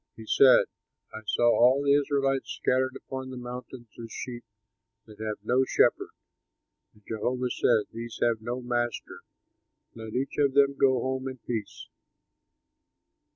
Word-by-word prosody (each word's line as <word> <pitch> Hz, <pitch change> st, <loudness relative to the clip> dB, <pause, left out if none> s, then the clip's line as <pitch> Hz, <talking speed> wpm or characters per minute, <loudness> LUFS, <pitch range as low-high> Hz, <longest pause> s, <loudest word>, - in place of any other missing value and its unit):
He 110 Hz, -, -11 dB
said, 130 Hz, +4 st, +6 dB, 0.5 s
"I 110 Hz, -, -7 dB
saw 120 Hz, -, 0 dB
all 130 Hz, +4 st, +4 dB
the 140 Hz, 0 st, +4 dB
Israelites 135 Hz, -1 st, +1 dB
scattered 130 Hz, 0 st, 0 dB
upon 130 Hz, 0 st, -7 dB
the 130 Hz, -, -7 dB
mountains 125 Hz, 0 st, -8 dB, 0.2 s
as 115 Hz, -, -9 dB
sheep 120 Hz, 0 st, -6 dB, 0.6 s
that 105 Hz, -1 st, -16 dB
have 110 Hz, -1 st, -3 dB
no 125 Hz, +4 st, +2 dB
shepherd. -, -, +2 dB, 0.8 s
And 105 Hz, -, -24 dB
Jehovah 125 Hz, +3 st, -2 dB
said, 115 Hz, -3 st, +2 dB
'These 115 Hz, 0 st, -7 dB
have 115 Hz, -2 st, +1 dB
no 120 Hz, +3 st, -4 dB
master; 120 Hz, -1 st, -3 dB, 0.7 s
let 110 Hz, -1 st, -9 dB
each 135 Hz, +3 st, -2 dB
of 140 Hz, -2 st, +2 dB
them 140 Hz, 0 st, +5 dB
go 130 Hz, -2 st, +3 dB
home 130 Hz, +1 st, -2 dB
in 130 Hz, 0 st, -6 dB
peace!'" 115 Hz, -3 st, -6 dB
125 Hz, 145 wpm, -27 LUFS, 115-130 Hz, 0.8 s, said